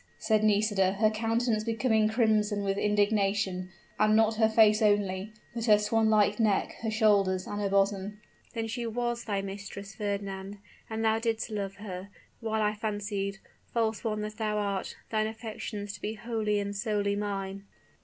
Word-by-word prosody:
said 220 -1 +1
Nisida, 205 -2 +3
her 215 +2 +3
countenance 225 0 0
becoming 220 -1 +2
crimson 215 -3 +2
with 195 0 0
indignation, 200 -3 +1 0.3
and 215 0 +4
not 220 0 +3
her 220 -1 +4
face 220 0 +5
only, 205 -1 +1 0.2
but 230 -1 -3
her 210 -3 +7
swan 220 +1 +2
like 210 -1 +3
neck, 215 -3 +2
her 225 - -1
shoulders, 200 -4 +3
and 205 0 -4
her 200 - 0
bosom. 200 +1 +1 0.4
"Then 225 -1 -1
she 235 +1 -3
was 240 +1 -2
thy 200 -3 -1
mistress, 195 0 -7
Fernand! 200 -1 -4 0.3
And 225 0 -2
thou 220 0 +3
didst 225 0 -1
love 200 -2 -3
her, 195 -2 -7 0.3
while 220 -1 -1
I 210 0 +2
fancied, 205 -2 -3 0.4
false 225 -2 0
one 215 -2 -1
that 210 0 -5
thou 215 -1 -1
art, 200 -2 -2 0.2
thine 215 -1 +1
affections 220 -2 -6
to 195 - -10
be 215 +1 -3
wholly 215 -2 -1
and 200 0 -3
solely 205 -1 0
mine." 200 -1 -4
210 Hz, 165 wpm, -29 LUFS, 200-220 Hz, 0.4 s, her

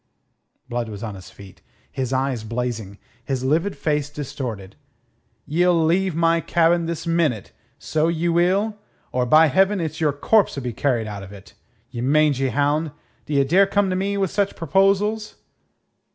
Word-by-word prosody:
Blood 120 -2 -3
was 105 0 -8
on 110 -2 -4
his 95 -2 -11
feet, 100 -2 -15 0.3
his 130 -3 -3
eyes 130 -3 -1
blazing, 115 -3 -4 0.3
his 130 -2 -3
livid 165 +9 0
face 150 -2 -1
distorted. 125 -9 -6 0.7
"Ye'll 175 +2 +2
leave 180 +1 +1
my 165 0 +3
cabin 170 0 +2
this 170 0 -4
minute, 165 - 0 0.3
so 155 +1 0
ye 170 0 -1
will, 190 +5 +1 0.3
or, 125 0 0
by 155 +4 +6
Heaven, 195 +7 +2
it's 160 -1 -4
your 150 -2 +3
corpse'll 145 - +1
be 120 -2 -3
carried 120 -2 0
out 105 -2 -6
of 95 0 -10
it. 100 +1 -14 0.4
Ye 120 -2 -5
mangy 140 0 +2
hound, 145 +2 0 0.3
d'ye 140 -2 +2
dare 185 +8 +4
come 200 -1 +1
to - - 0
me 200 +2 -1
with 195 -3 0
such 200 -1 0
proposals?" 195 +6 +1
150 Hz, 160 wpm, -22 LUFS, 125-175 Hz, 0.7 s, by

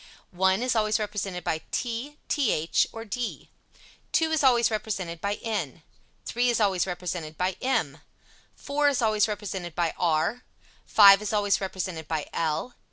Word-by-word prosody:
1 190 +4 +2
is 250 -1 +1
always 215 -1 +2
represented 205 -4 -4
by 160 -1 -1
t, 250 +5 -3
th 210 - +1
or 225 0 -8
d. 235 +3 -5 0.6
2 320 -1 +2
is 315 -2 +1
always 240 -3 +4
represented 195 -6 -3
by 200 +1 -1
n. 220 -2 -3 0.4
3 245 +1 +1
is 235 - +1
always 195 -4 +2
represented 175 -3 -5
by 180 0 0
m. 225 - 0 0.6
4 290 +1 +1
is 275 -3 0
always 215 -1 +3
represented 195 -5 -5
by 170 -2 0
r. 170 +8 +1 0.5
5 200 -1 +8
is 210 - -3
always 205 -2 +1
represented 185 -4 -4
by 155 -2 -2
l. 165 +9 -1
205 Hz, 155 wpm, -26 LUFS, 175-230 Hz, 0.6 s, 5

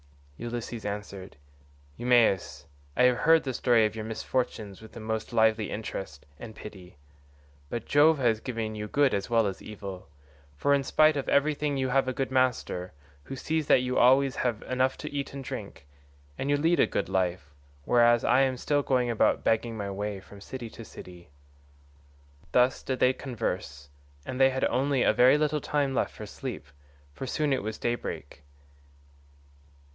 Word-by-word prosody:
Ulysses 120 -1 -5
answered, 100 -2 -6 0.6
"Eumaeus, 120 -6 +2 0.3
I - - +4
have 125 -1 +5
heard 160 +5 +4
the 130 - -3
story 120 -2 +3
of 105 - -2
your 110 - -4
misfortunes 110 -2 -3
with 110 - -13
the - - -9
most 110 +1 -4
lively 110 -2 +2
interest 95 -9 -6
and 110 -2 -9
pity, 95 -6 -11 0.7
but 115 +4 -4
Jove 150 +2 +5
has 120 -5 +2
given 115 -3 -4
you 105 0 -5
good 140 +3 +2
as 100 +3 -2
well 115 -2 +3
as 95 -2 -3
evil, 100 -5 -8 0.5
for 140 - +2
in 140 - +3
spite 155 +3 +4
of 140 - -3
everything 145 0 +1
you 130 -1 0
have 135 +1 +2
a 130 - -1
good 135 +1 -3
master, 125 -8 0 0.3
who - - -6
sees 155 +2 -2
that 125 - +5
you 125 0 0
always 135 +2 +4
have 120 -4 -1
enough 130 +1 0
to - - -7
eat 140 -1 -3
and 135 - -6
drink; 70 - -7 0.5
and 135 - -2
you 145 - +3
lead 165 +4 +2
a - - +5
good - - -2
life, 90 -6 -2 0.3
whereas 120 -1 +4
I 125 +2 +4
am 130 -1 +1
still 145 +3 +1
going 125 -3 +1
about 115 - +2
begging 115 0 0
my 100 -2 -4
way 100 0 -4
from 100 +1 -14
city 120 +1 -7
to 115 - -10
city." 90 -5 -12 1.2
Thus 125 +1 +3
did 130 - -3
they 125 - +4
converse, 90 - -5 0.4
and 130 0 -3
they 135 - +7
had 130 0 0
only 135 +1 +1
a - - +4
very 130 +4 +6
little 150 0 0
time 145 -2 0
left - - 0
for 105 - -7
sleep, 115 - -7 0.5
for 135 - -6
it 140 +1 0
was 110 +2 -4
soon - - -14
daybreak. 120 -10 -4
120 Hz, 175 wpm, -28 LUFS, 105-135 Hz, 1.2 s, they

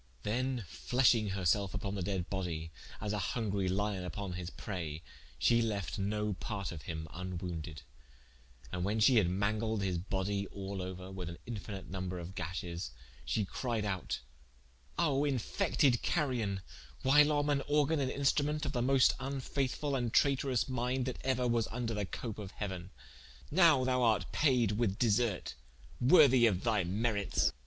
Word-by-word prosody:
Then 125 +1 -1
fleashing 115 - +2
her 95 -1 -3
selfe 95 +3 +2
vpon 100 -3 -3
the 100 - -3
dead 90 -1 -2
body, 85 -4 -3 0.3
as 105 0 -2
a 105 - -1
hungry 100 -1 -1
lion 100 0 -1
vpon 100 -2 -5
his 90 -1 -5
praye, 85 -6 -5 0.3
she 115 0 +4
lefte 105 -4 -2
no 105 +1 0
parte 100 0 -4
of 80 -4 -7
him 80 0 -5
vnwounded: 85 -4 -5 0.9
and 90 - -2
when 105 +4 0
shee 120 +3 +6
had 95 -5 +4
mangled 105 +3 0
his 90 -3 0
bodye 100 +2 -2
all 100 0 -5
ouer, 90 0 -6
with 90 -3 -5
an 85 - -8
infinite 105 -4 -6
number 95 -1 -4
of 85 +2 -7
gashes, 90 0 -4 0.4
she 105 - 0
cried 115 +1 -2
out: 95 -3 -2 0.8
"O 145 -5 +2
infected 140 - +2
carrion, 120 - 0 0.4
whilom 145 +2 +5
an 140 -1 +2
organ 150 +1 +2
and 135 -2 0
instrumente 145 +2 +1
of - - -1
the 120 - -1
moste 130 +1 +4
vnfaithfull 135 +1 -2
and 120 -3 -1
trayterous 135 -3 +3
minde 130 0 -1
that 130 - -4
euer 130 -1 +1
was 115 -2 +1
vnder 115 -1 -3
the 105 -2 -2
coape 110 0 -5
of 100 -2 -8
heauen. 95 -3 -4 0.6
Nowe 155 -6 +5
thou 125 -1 +2
art 110 -4 +2
payed 125 -8 +3
with 105 -2 0
deserte, 115 -3 +1 0.5
worthy 130 -3 +7
of 95 -4 0
thy 110 -5 +2
merites!" 100 +3 +1
105 Hz, 160 wpm, -33 LUFS, 95-130 Hz, 0.9 s, worthy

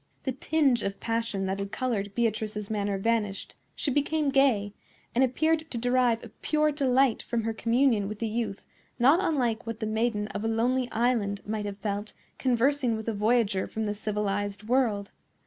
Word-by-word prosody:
The 265 - -1
tinge 270 -2 +2
of 200 0 -3
passion 230 -4 -1
that 190 +1 -2
had 200 0 -4
colored 205 -6 -2
Beatrice's 215 -2 -1
manner 205 -2 -1
vanished; 210 -1 -1 0.2
she 285 - -1
became 290 +2 +1
gay, 255 -8 +3 0.4
and 250 - +3
appeared 315 +5 +1
to 240 - -5
derive 245 -1 +2
a 235 - -9
pure 305 0 +2
delight 270 -3 +2
from 235 -2 -2
her 225 0 -1
communion 230 -2 +2
with 215 +1 -5
the 230 - -2
youth 215 -2 -3 0.3
not 270 +8 +5
unlike 245 - 0
what 230 -1 -4
the 220 - -2
maiden 220 -1 0
of 205 - -4
a - - 0
lonely 245 +3 +1
island 220 -4 +1
might 210 0 -3
have 200 -1 -5
felt 205 0 -3 0.3
conversing 255 0 +2
with 220 0 -6
a - - -1
voyager 210 -2 +1
from 220 0 -3
the 205 - -1
civilized 205 -1 -2
world. 220 -4 +1
230 Hz, 180 wpm, -28 LUFS, 205-255 Hz, 0.4 s, not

